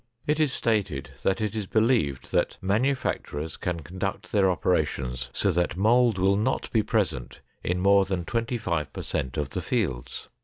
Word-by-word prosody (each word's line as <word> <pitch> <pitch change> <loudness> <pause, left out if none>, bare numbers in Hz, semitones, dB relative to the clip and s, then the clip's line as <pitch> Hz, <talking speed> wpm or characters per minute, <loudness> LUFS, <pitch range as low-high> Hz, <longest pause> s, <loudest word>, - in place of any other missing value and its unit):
It 150 +1 +1
is 155 -3 +3
stated 95 - -1
that 95 +3 +1
it 105 0 -1
is 105 -3 -3
believed 110 - +1
that - - +1
manufacturers 100 - -1
can 90 -2 -3
conduct 95 +6 -4
their 100 -3 +4
operations 65 -9 0
so - - +1
that 85 0 0
mold 115 +2 +4
will 95 +1 +3
not 115 +6 -1
be 110 - +4
present 95 - -1 0.2
in 90 +1 0
more 100 +1 +5
than 95 -3 -2
25 115 - -1
per - - -5
cent 65 +3 -2
of 75 -3 -2
the 90 - -2
fields. 85 - -2
95 Hz, 165 wpm, -26 LUFS, 80-110 Hz, 0.2 s, more